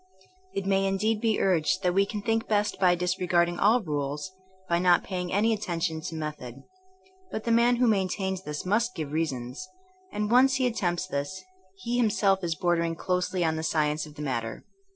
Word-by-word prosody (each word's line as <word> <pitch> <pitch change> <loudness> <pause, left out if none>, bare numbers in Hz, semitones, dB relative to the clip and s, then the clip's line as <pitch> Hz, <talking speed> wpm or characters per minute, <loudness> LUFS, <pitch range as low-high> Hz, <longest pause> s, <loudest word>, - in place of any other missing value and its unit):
It 195 - -2
may 195 0 +2
indeed 210 +3 0
be 225 -2 +1
urged 185 +1 +1
that 180 -1 +2
we 195 +1 +3
can 205 -1 -5
think 225 0 0
best 210 -1 0
by 180 -2 +4
disregarding 175 -1 +1
all 220 +4 +4
rules, 150 +2 -3 0.2
'* 190 0 -32
by 170 -1 +1
not 175 -1 +4
pay 185 -2 -3
ing 180 - -5
any 220 +3 +2
attention 170 -6 -2
to 160 - -6
method. 150 -5 -6 0.7
But 220 - -5
the 235 - -1
man 235 +1 +4
who 250 +1 +2
maintains 190 -3 0
this 150 -2 -6
must 230 +6 +1
give 155 -3 -4
reasons; 150 +1 -3 0.4
and 210 +1 -2
once 265 +2 +5
he 260 -1 +1
attempts 185 -8 -1
this 185 +3 -4 0.4
he 240 +1 -1
himself 205 -5 +2
is 165 -1 -1
bordering 170 0 0
closely 180 +1 -1
on 160 0 0
the - - -2
science 155 -1 0
of 150 - -14
the 150 - -6
matter. 115 -5 -3
185 Hz, 195 wpm, -27 LUFS, 160-210 Hz, 0.7 s, once